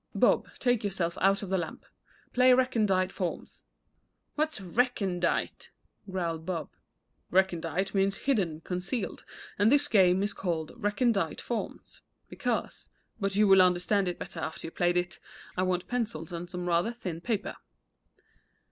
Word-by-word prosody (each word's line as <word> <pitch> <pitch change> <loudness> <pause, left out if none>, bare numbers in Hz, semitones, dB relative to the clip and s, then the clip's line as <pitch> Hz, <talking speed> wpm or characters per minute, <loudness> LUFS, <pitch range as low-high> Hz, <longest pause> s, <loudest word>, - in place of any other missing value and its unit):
Bob, - - +3
take 245 -3 +1
yourself 185 -4 -1
out 195 +2 +3
of 190 - -6
the 190 - +2
lamp. 165 -2 -6 0.5
Play 250 0 +6
'Recondite 210 -8 +2
Forms.'" 180 -3 -5 0.7
"What's 310 -3 -1
recondite?" 195 -2 0 0.4
growled 170 -4 -2
Bob. 165 -4 -4 0.6
"Recondite 180 0 +1
means 195 0 +2
hidden, 185 - +1
concealed, 185 +6 -4 0.4
and 205 +3 +5
this 285 0 +4
game 190 -3 +4
is 205 - -1
called 165 -4 -2
'Recondite 210 -5 0
Forms' 235 - -5 0.3
because - - -3 0.3
But 195 -2 -1
you 210 +1 +5
will 195 -1 +8
understand 185 +2 +3
it 175 - -2
better 165 - -7
after 160 - -5
you 165 - -6
have - - -36
played 175 0 +2
it. 175 0 -2 0.4
I 180 - 0
want 180 -1 0
pencils 210 -10 -3
and 175 0 -5
some 180 0 -5
rather 175 +6 +2
thin 180 -8 -6
paper." 215 0 -2
190 Hz, 145 wpm, -29 LUFS, 175-210 Hz, 0.7 s, will